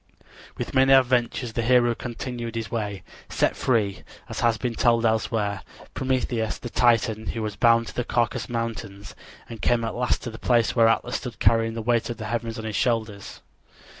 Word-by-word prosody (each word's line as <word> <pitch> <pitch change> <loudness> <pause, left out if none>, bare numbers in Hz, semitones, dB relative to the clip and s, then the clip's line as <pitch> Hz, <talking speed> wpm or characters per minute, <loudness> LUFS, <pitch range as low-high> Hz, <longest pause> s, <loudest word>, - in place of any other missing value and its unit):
With - - -5
many 135 0 +5
adventures 125 -2 +2
the 115 - -1
hero 120 0 +4
continued 120 -1 -6
his 115 -3 -4
way, 105 -5 -3 0.3
set - - +1
free, 105 -6 0 0.3
as - - -5
has 115 -1 +2
been 120 +1 -2
told 115 0 +2
elsewhere, 110 -3 0 0.3
Prometheus, 125 -4 -1
the 120 - -8
Titan, 115 -2 +2
who 115 - -3
was 105 -2 -4
bound 115 +1 +4
to - - -9
the 125 - -2
Caucasus 120 +1 -1
Mountains, 115 -4 -5 0.3
and 115 -2 -9
came 120 -1 +2
at 115 - -2
last 125 0 -1
to 120 - -5
the 110 - -10
place 120 -3 +2
where 115 -2 +5
Atlas 115 - +1
stood - - -7
carrying 115 0 +2
the 115 - -4
weight 120 0 +1
of 120 - -4
the 110 - -6
heavens 115 +1 -3
on 110 - -6
his 110 -2 -4
shoulders. 110 -5 -2
115 Hz, 190 wpm, -24 LUFS, 110-120 Hz, 0.3 s, many